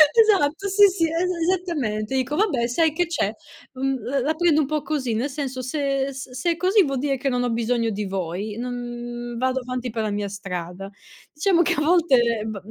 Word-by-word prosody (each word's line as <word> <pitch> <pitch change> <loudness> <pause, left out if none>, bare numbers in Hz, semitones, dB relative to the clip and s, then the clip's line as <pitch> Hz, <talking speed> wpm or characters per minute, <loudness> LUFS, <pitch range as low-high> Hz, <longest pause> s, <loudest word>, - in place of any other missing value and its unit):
Esatto, 395 -5 +4
sì, 405 +1 +7
sì, 370 -3 +1
e - - -4 0.3
esattamente. 285 - -1
Dico: 260 +3 0
"Vabbè, 305 - +1
sai 315 +5 +2
che 355 +2 +1
c'è? 335 0 -1 0.4
Mhmm, 270 +1 -1
l 255 +5 -1
la 310 +3 +1
prendo 315 -2 +3
un 270 - -1
po' 305 -1 -1
così. 265 -7 -2
Nel 245 +6 -1
senso, 265 -2 -4
se 275 +1 -1
s 260 -1 -8
se 260 +8 0
è 335 - -2
così, 380 +3 +4
vuol 275 -3 -2
dire 275 0 0
che 275 +2 -1
non 245 -1 0
ho 245 - 0
bisogno 230 0 0
di 205 0 -3
voi. 190 +3 -4
Non 240 0 -5
vado 260 +1 0
avanti 250 -1 -4
per 225 -1 -2
la 215 - -1
mia 205 0 -2
strada". 185 -1 -6 0.4
Diciamo 345 +3 +2
che - - +2
a 295 - -1
volte 260 -10 +3
b 215 -2 -4
260 Hz, 210 wpm, -23 LUFS, 235-310 Hz, 0.4 s, sì